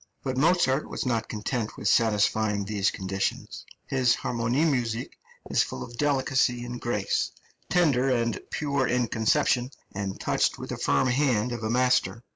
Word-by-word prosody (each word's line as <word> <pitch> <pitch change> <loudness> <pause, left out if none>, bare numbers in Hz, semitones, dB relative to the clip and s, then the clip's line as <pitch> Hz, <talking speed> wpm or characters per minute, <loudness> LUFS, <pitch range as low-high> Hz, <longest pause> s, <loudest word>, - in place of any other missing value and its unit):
But 130 -1 -2
Mozart 150 -1 +2
was - - -4
not 115 -3 -1
content 110 +1 -3
with 105 - -3
satisfying 105 -2 +2
these 100 -1 +1
conditions; 95 0 -4 0.2
his 130 -3 +2
harmonie 125 +5 0
musik 120 -6 -1 0.4
is - - +4
full 65 - -3
of 120 - -10
delicacy 130 -3 +1
and 120 0 -6
grace, 105 -5 0 0.4
tender 145 -7 +3
and 115 -3 0
pure 140 -4 0
in 125 -2 +1
conception, 120 +3 +2 0.2
and 95 -1 -4
touched - - +1
with - - -8
the - - -4
firm 130 - +2
hand 125 -3 +1
of 120 -2 -4
a 110 - -2
master. 125 -1 +1
120 Hz, 155 wpm, -26 LUFS, 110-130 Hz, 0.4 s, is